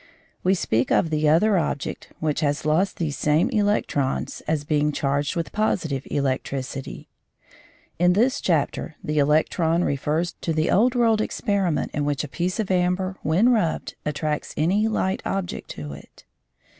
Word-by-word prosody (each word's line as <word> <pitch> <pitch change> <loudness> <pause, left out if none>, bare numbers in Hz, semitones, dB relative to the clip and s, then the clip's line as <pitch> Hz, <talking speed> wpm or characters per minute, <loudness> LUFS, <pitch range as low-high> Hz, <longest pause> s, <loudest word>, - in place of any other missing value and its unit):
We 185 +2 +3
speak 120 -8 0
of 165 - +2
the 155 -1 +2
other 190 +5 +4
object, 145 -3 -3
which 155 -2 0
has 145 -1 -1
lost 170 +6 +1
these 155 -4 -2
same 150 +2 +2
electrons, 205 -10 0
as 155 -2 0
being 150 0 +1
charged 140 0 -1
with 170 -1 -3
positive 160 -10 -1
electricity. 135 -1 -3 0.9
In 180 +1 +4
this 255 +8 +2
chapter 155 -2 0
the 150 0 0
electron 160 +3 +2
refers 155 +5 0
to 165 - -1
the 155 0 +1
old 240 +5 +3
world 225 -3 +3
experiment 200 -7 -1
in 150 - -1
which 145 -1 -1
a - - -4
piece 175 - -2
of 210 -3 -1
amber 185 +1 0
when 180 +10 +3
rubbed 215 -10 0
attracts 150 0 -3
any 195 +8 +2
light 190 -3 -1
object 195 -2 -3
to 75 -2 -7
it. 70 - -14
160 Hz, 155 wpm, -24 LUFS, 145-190 Hz, 0.9 s, other